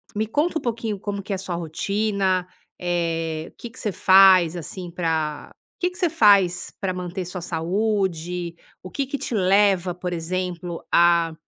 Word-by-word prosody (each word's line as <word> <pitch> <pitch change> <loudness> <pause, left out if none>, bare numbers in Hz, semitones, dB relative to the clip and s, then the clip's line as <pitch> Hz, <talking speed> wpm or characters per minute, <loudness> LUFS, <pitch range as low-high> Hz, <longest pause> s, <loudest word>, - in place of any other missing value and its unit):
me 215 +1 -1
conta 315 +7 0
um - - -14
pouquinho 225 -4 -3
como 200 -1 -4
que 200 - -4
é - - -1
a - - -8
sua 180 -2 -4
rotina, 190 +2 -1 0.3
eh, 165 -2 -2
o - - -38
que 235 - -8
que 255 - -13
você 210 - -2
faz 185 -2 +6
assim 175 +1 -7
pra 160 -3 -2 0.2
o - - -74
que 360 - +2
que 360 - -13
você 360 -2 +2
faz 200 - +4
pra 190 -2 -2
manter 180 0 -5
sua 180 0 -6
saúde? 180 -1 -2 0.3
O 185 - -9
que 275 -2 -2
que 280 - -3
te 245 - -5
leva 190 -2 +3
por 180 0 -4
exemplo, 175 0 -4
a 170 -1 +4
185 Hz, 185 wpm, -23 LUFS, 170-205 Hz, 0.3 s, faz